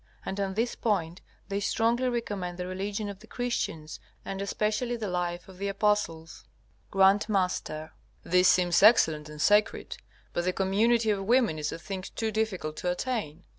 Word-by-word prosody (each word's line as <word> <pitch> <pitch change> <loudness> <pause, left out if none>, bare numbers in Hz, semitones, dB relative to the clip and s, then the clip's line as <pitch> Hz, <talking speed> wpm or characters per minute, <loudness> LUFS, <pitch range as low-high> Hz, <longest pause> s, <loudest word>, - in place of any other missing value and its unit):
And 195 - -4
on 195 -1 -2
this 235 +3 0
point 185 -6 -1 0.3
they 200 0 -2
strongly 235 +5 +1
recommend 205 -7 -3
the 180 - -4
religion 200 +3 -3
of 200 -1 -7
the 220 - -16
Christians, 165 -11 -3 0.3
and 195 0 -4
especially 215 +4 -1
the 225 -3 -4
life 175 -1 -2
of 185 -1 -14
the 200 - -2
apostles. 195 -5 -1 0.5
G.M. 195 0 +5 1.0
This 180 +1 +4
seems 175 -2 +4
excellent 160 -8 +5
and 150 0 -10
sacred, 210 +6 +2 0.4
but 175 - -1
the 185 - +1
community 220 +4 +2
of 195 -2 -1
women 230 -8 +3
is 150 - -2
a - - -5
thing 190 +3 -6
too 225 -1 -1
difficult 195 -8 -2
to 180 - -2
attain. 180 - -3
195 Hz, 165 wpm, -28 LUFS, 180-220 Hz, 1.0 s, G.M